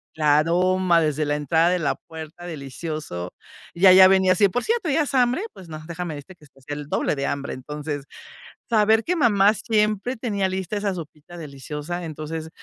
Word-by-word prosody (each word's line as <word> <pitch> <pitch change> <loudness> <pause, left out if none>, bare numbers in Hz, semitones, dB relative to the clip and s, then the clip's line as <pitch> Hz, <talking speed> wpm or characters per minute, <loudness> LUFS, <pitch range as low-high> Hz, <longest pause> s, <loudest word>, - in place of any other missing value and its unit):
la 150 -2 +3
aroma 180 +2 +2
desde 155 -1 0
la 145 0 0
entrada 160 +3 +2
de 180 0 +1
la 150 - 0
puerta, 160 +2 -11
delicioso. 140 - -6 0.4
Y 185 +3 +4
ahí 185 - +9
ya 190 0 +10
venía, 190 -1 +4 0.2
"Por 245 - -1
cierto, 455 -6 -1
¿ya 315 +3 +2
hace 265 -1 -1
hambre?". 250 +6 +2
Pues 185 -3 -13
no, 155 -1 -7
déjame 170 -1 -5
decirte 145 +6 -10
que 155 - -20
hasta 135 -1 -23
hacía 145 +2 -7
el 145 -1 -7
doble - - 0
de 140 - -3
hambre. 140 0 -3
Entonces, 145 +1 -6 0.6
saber 220 0 +3
que 360 0 -1
mamá 210 -6 +4
siempre 215 +2 0
tenía 205 -5 -1
lista 190 +2 -3
esa 200 -1 -1
sopita 160 0 -10
deliciosa, 150 +3 -6
entonces 160 +1 -6
170 Hz, 190 wpm, -23 LUFS, 150-200 Hz, 0.6 s, ya